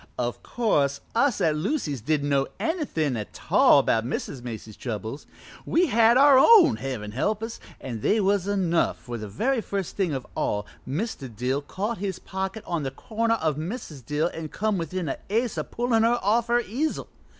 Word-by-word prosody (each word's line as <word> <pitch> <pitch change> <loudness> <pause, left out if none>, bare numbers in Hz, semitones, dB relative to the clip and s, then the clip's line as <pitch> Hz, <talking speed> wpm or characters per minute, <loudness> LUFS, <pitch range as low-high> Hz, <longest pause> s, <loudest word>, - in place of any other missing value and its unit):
"O' 120 -1 0
course, 145 - 0
us 245 +1 +2
at 155 -2 +3
Lucy's 155 - -2
didn't 145 +3 0
know 135 -1 +2
anythin' 260 - -1
a 105 -2 -3
tall - - +4
about 115 - +2
Mrs. 130 +1 -4
Macy's 110 -3 -7
troubles. 115 +3 -5 0.4
We 350 +2 +2
had 235 -3 +4
our 275 -1 +7
own, 405 +1 +7
Heaven 120 -6 -5
help 210 - -1
us, 225 +1 -5 0.2
an' 120 -4 -5
they 215 - +2
was 200 -1 +1
enough, 185 -4 +1
for 120 -1 -7
the 105 - -6
very 230 - 0
first 200 -4 -4
thing 190 -5 +1
of 135 -3 -3
all 105 0 -1 0.2
Mr. 150 - -3
Dill 125 +5 -2
caught 205 +9 -4
his 195 -2 -3
pocket 190 +3 -5
on 170 -2 -2
the 135 - -2
corner 225 - -1
of 155 -8 -1
Mrs. 160 - -6
Dill 150 +6 0
an' 160 -1 -6
come 210 +1 -1
within 170 +1 -3
a - - -3
ace 230 +3 0
of - - -4
pullin' 235 -1 +1
her 230 +2 +4
off 225 +4 +2
her 240 +1 +3
easel. 260 +9 -2
180 Hz, 185 wpm, -25 LUFS, 135-230 Hz, 0.4 s, our